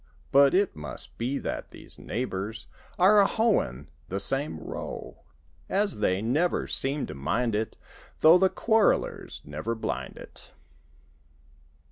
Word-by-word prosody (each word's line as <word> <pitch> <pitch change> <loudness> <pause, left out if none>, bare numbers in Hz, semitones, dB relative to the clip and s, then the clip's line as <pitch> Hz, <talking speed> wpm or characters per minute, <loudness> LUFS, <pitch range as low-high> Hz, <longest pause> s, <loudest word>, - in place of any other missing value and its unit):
But 140 +3 +6
it 200 0 +2
must 75 -1 -7
be 125 +4 -1
that - - -4
these - - -11
neighbors 110 -3 -4 0.3
Are 200 +3 +6
a 195 - +4
hoein' 75 - +1 0.2
the 95 - -2
same 135 - -1
row. 80 - -7 0.5
As 200 - +1
they 95 -1 +1
never 150 +10 +1
seem 140 +2 -2
to - - -7
mind 115 - -1
it 110 +1 -2 0.4
Though 165 +3 +8
the 190 0 +4
quarrelers 220 +1 +1
never 75 +11 -3
blind 110 - -4
it. - - -11
130 Hz, 130 wpm, -27 LUFS, -, 0.5 s, Though